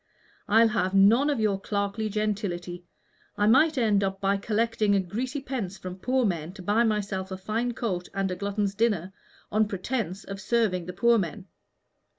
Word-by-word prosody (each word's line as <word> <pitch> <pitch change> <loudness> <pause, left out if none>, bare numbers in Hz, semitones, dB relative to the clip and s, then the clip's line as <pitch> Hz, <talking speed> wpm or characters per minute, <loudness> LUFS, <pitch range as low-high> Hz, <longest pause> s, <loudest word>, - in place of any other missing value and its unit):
I'll 225 +2 +5
have 195 -4 0
none 225 +9 +5
of 285 -5 0
your 205 -3 +1
clerkly 205 +2 -2
gentility. 195 -5 -3 0.5
I 205 - +2
might 285 +7 +4
end 210 -5 +3 0.2
by 195 0 +1
collecting 215 -1 +1
greasy 255 +8 -3
pence 230 -8 -4
from 185 0 -8
poor 255 +4 +1
men 170 -3 -2
to 190 -2 -10
buy 210 +5 +2
myself 205 -4 -1
a 190 - -5
fine 225 +5 -2
coat 180 -6 -3
and 195 -1 -1
a - - -2
glutton's 200 +1 -2
dinner, 195 -4 0 0.4
on 215 0 +2
pretence 195 -1 -3
of 195 0 -7
serving 200 -6 0
the 180 - -5
poor 235 +5 +4
men. 185 +2 -4
205 Hz, 165 wpm, -27 LUFS, 190-230 Hz, 0.5 s, I'll